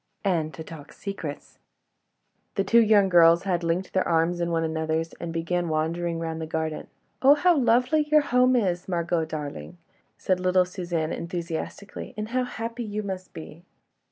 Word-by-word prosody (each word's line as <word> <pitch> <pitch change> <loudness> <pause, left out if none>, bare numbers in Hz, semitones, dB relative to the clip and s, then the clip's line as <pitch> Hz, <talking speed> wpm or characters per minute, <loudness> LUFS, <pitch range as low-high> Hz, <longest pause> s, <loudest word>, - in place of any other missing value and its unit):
"And 165 -5 +1
to 160 - -7
talk 155 -3 -11
secrets." 185 -8 -7 1.0
The 195 - +1
two 230 +4 +5
young 210 -3 +5
girls 170 -1 +6
had 180 -3 -1
linked 170 +3 -1
their 190 - +1
arms 170 +1 +1
in 170 - 0
one 165 -1 0
another's 160 0 -2
and 170 - -5
began 170 +1 -1
wandering 165 +2 -1
round 165 -1 -4
the 160 - -4
garden. 160 -1 -3 0.3
"Oh! 275 +2 +7
how 355 +3 +4
lovely 250 +3 +3
your 305 0 +6
home 255 -2 +3
is, 180 -7 0
Margot, 170 -2 0
darling," 155 +2 -6 0.4
said 185 -1 0
little 185 0 +3
Suzanne, 175 -3 -3
enthusiastically, 170 +3 -6
"and 215 0 -4
how 255 +1 0
happy 230 0 -5
you 210 -1 -4
must 190 -2 -6
be!" 160 +1 -10
175 Hz, 165 wpm, -25 LUFS, 165-205 Hz, 1.0 s, Oh